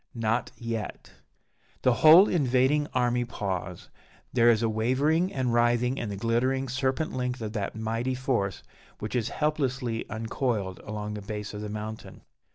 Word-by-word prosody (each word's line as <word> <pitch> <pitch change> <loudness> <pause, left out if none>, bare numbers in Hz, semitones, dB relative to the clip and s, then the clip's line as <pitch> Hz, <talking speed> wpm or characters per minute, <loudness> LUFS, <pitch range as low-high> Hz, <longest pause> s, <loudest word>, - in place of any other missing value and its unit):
_" - - -5
"Not 115 +2 0
yet!" 115 -3 -5 0.7
The 125 - +5
whole 165 +6 +9
invading 140 -1 +2
army 125 -1 +1
pause: 100 -6 -4 0.4
there 120 -1 +5
is 115 -1 +3
a - - +3
wavering 135 - +1
and 130 -3 -1
writhing 120 +2 +2
in 115 - -3
the 100 - -4
glittering 125 +5 0
serpent 130 +4 -1
length 125 0 -2
of 105 0 -4
that 105 -2 -3
mighty 115 +4 -2
force 120 -7 -1 0.3
which 105 +4 -5
is 120 -2 0
helplessly 135 -6 -1
uncoiled 110 -3 -2
along 105 0 -5
the 105 - -5
base 105 +1 -6
of 105 - -6
the 105 - -5
mountain. 110 +1 -7
120 Hz, 160 wpm, -27 LUFS, 110-130 Hz, 0.7 s, whole